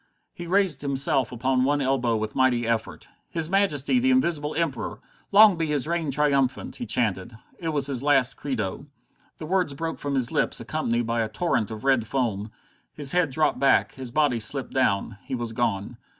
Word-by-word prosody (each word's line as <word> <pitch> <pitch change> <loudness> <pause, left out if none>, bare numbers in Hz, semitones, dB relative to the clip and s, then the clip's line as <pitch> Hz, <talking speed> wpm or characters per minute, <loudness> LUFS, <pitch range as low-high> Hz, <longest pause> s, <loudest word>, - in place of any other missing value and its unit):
He 175 - -8
raised 185 -5 +1
himself 140 -1 0
upon 130 +1 0
one 145 +2 +2
elbow 130 -4 +1
with 110 0 -4
a - - -8
mighty 125 -3 +2
effort. 115 -1 -3 0.2
"His 165 0 0
Majesty 195 - +2
the 260 +2 +2
Invisible 170 - +1
Emperor! 160 -6 -2 0.3
Long 205 -2 +7
be 165 -1 -1
his 145 -3 -1
reign 165 -2 -1
triumphant!" 140 -2 0
he 245 - -6
chanted. 110 -1 -1 0.2
It 165 - -3
was 145 -4 0
his 135 -3 -1
last 135 -3 +2
credo. 130 -1 -4 0.5
The 155 - -7
words 175 -4 0
broke 165 +3 -4
from 140 -1 -3
his 130 -2 0
lips 155 - 0
accompanied 120 -7 -1
by 115 0 0
a 110 - -2
torrent 120 - -1
of 110 -1 -7
red 130 -5 +2
foam. 110 -5 -2 0.4
His 140 - 0
head 180 -4 +2
dropped 150 0 +1
back, 135 0 +3
his 130 -2 -7
body 135 -2 +1
slipped 130 +4 -2
down; 105 -4 0
he 130 - -4
was 120 -2 -4
gone. 115 -1 -2
135 Hz, 190 wpm, -25 LUFS, 120-155 Hz, 0.5 s, Long